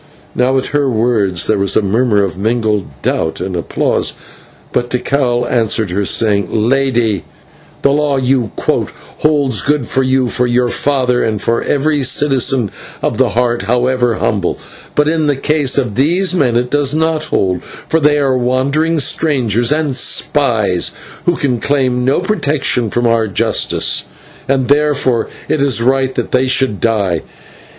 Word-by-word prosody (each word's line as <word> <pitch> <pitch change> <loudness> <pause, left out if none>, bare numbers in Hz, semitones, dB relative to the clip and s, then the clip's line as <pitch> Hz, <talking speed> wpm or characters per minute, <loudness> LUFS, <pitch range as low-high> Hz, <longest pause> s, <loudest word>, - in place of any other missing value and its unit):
Now 130 +2 +1
at 130 - -1
her 145 -2 +1
words 110 -6 +1
there 110 -2 +1
was 100 0 +1
a - - +2
murmur 105 +1 +1
of 95 - -3
mingled 110 0 -1 0.2
doubt 80 - -1
and 95 0 -4
applause, 85 - -1 0.6
but 120 0 -1
Tikal 125 -1 0
answered 110 -4 0
her, 100 +2 -1
saying: 100 -2 +1
"Lady, 120 -2 0 0.6
the 140 - +4
law 145 -1 +1
you 130 -4 0
quote - - -1 0.3
holds 145 -6 +2
good 145 -3 0
for 130 - 0
you, 130 0 +1
for 125 +1 0
your 120 0 +1
father, 130 -2 +1
and 110 -2 -1
for 115 +3 0
every 145 +1 0
citizen 135 -4 +2 0.3
of - - -1
the - - +3
Heart, 120 -1 +1
however 125 -1 +1
humble; 100 -5 -1 0.4
but 150 0 +2
in 160 -1 +1
the 145 - +1
case 145 -1 0
of 125 -7 0
these 175 - +1
men 135 -9 +1
it 125 +1 -2
does 145 0 +1
not 160 -1 0
hold, 95 -2 -1 0.3
for 160 - +1
they 150 -1 +3
are 135 -2 +1
wandering 135 +6 0
strangers 130 -5 +1
and 150 -3 0
spies, 120 -8 +1 0.4
who 175 - +3
can 130 -6 -1
claim 130 -3 0
no 135 +6 +1
protection 145 - 0
from 120 +3 -1
our 115 -1 +2
justice, 100 - +1 0.4
and 135 -2 +1
therefore 140 -5 +1 0.2
it 155 - 0
is 140 -4 +2
right 130 +2 +1
that - - -3
they 130 0 +2
should 125 -5 +1
die." 100 -7 0
125 Hz, 160 wpm, -14 LUFS, 115-140 Hz, 0.6 s, the